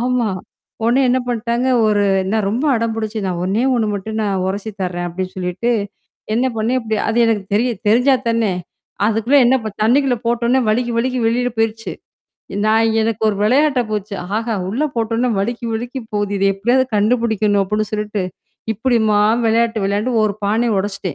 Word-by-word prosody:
ஆமா. 245 -2 +1 0.6
உடனே 240 +4 +3
என்ன 250 +1 +3
பண்ணிட்டாங்க, 240 +1 -1 0.2
ஒரு 205 -1 +2 0.3
நான் 215 -2 0
ரொம்ப 245 +8 -1
அடம்புடிச்சு 225 -1 -2
நான் 180 -2 -2
ஒண்ணே 200 +6 0
ஒண்ணு 225 -3 +1
மட்டும் 215 +2 -5
நான் 195 -3 -1
உரசி 200 +3 -3
தர்றேன் 175 -1 -2
அப்டின்னு 185 +2 -5
சொல்லிட்டு. 185 +6 -2 0.6
என்ன 250 +3 +2
பண்ணேன்? 235 +4 +1
இப்டி 220 -1 -2
அது 225 +1 0
எனக்கு 215 -3 0
தெரிய 240 +4 +2 0.2
தெரிஞ்சா 250 +5 +4
தானே. 230 -3 +1 0.5
அதுக்குள்ள 225 +5 +2
என்ன 255 +2 +4 0.3
தண்ணிக்குள்ள 255 +3 +3
போட்டோனே 235 +2 +2
வழுக்கி, 240 +2 +1
வழுக்கி 255 +2 0
வெளில 245 +2 +1
போயிருச்சு. 225 0 -1 0.7
நான் 220 +1 +3
எனக்கு 225 0 -1
ஒரு 205 - -2
விளையாட்ட 270 +3 +3
போச்சு. 210 -1 -3 0.2
ஆஹா! 230 0 -2 0.2
உள்ள 240 +9 -1
போட்டோடனே 230 +2 0
வழுக்கி, 235 +4 -2
வழுக்கி 245 +4 -4
போகுது. 205 -1 -1
இத 195 - -1
எப்டியாவது 240 +7 +2
கண்டுபுடிக்கணும் 215 -2 +2
அப்டின்னு 210 +2 -1
சொல்ட்டு, 210 -2 -2 0.5
இப்படிம்மா 220 -2 +2 0.3
விளையாட்டு 225 -1 +1
விளையான்டு, 205 +5 0
ஒரு 205 -2 -2
பானைய 225 +2 +1
உடைச்சிட்டேன். 200 0 -4
225 Hz, 155 wpm, -18 LUFS, 205-240 Hz, 0.7 s, தெரிஞ்சா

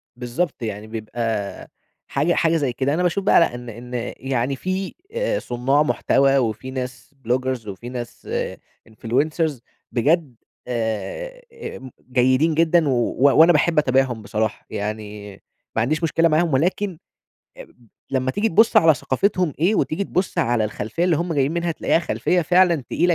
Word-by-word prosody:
بالضبط، 125 +5 -3
يعني 110 -1 -5
بيبقى 110 -2 -4 0.4
حاجة 150 +5 +1
حاجة 165 0 +2
زي 140 -6 -1
كده. 135 +3 0
أنا 175 +3 0
باشوف 180 +2 0
بقى - - +5
لأ 165 -7 +2
إن 120 0 -8 0.2
إن 120 0 -3
يعني 135 0 -1
في 185 +6 -3 0.2
آآ - - -1
صُناع 135 +5 +1
محتوى 135 -2 +2
وفي 120 +1 -2
ناس 125 +1 -6
بلوجرز 125 -1 -1
وفي 105 +5 -7
ناس 120 -1 -7 0.6
influencers 140 +6 -1 0.3
بجد 145 +1 +1 0.3
آآ 125 - -3 0.7
جيدين 130 +6 +3
جدًا، 165 -1 +3
و 120 -3 0 0.2
وأنا 165 +4 +7
باحب 160 +2 +2
أتابعهم 130 -5 +1
بصراحة، 110 +1 -2
يعني 105 0 -5 0.4
ما 115 - +2
عنديش 155 +8 0
مشكلة 165 +1 +3
معاهم 160 0 +2
ولكن 180 +5 0 1.1
لمّا 130 -1 0
تيجي 210 +10 0
تبُص 225 +7 +4
على 160 -2 +7
ثقافتهم 180 +5 0
إيه، 185 +7 +3
وتيجي 200 +1 0
تبُص 185 0 -2
على 115 -2 +2
الخلفية 110 +8 -2
اللي 175 -3 +3
هُم 170 +2 -2
جايين 140 -1 +1
منها، 170 0 -1
تلاقيها 160 - +1
خلفية 175 +1 0
فعلًا 175 +1 +4 0.2
تقيلة 175 0 +2
135 Hz, 150 wpm, -22 LUFS, 120-170 Hz, 1.1 s, وأنا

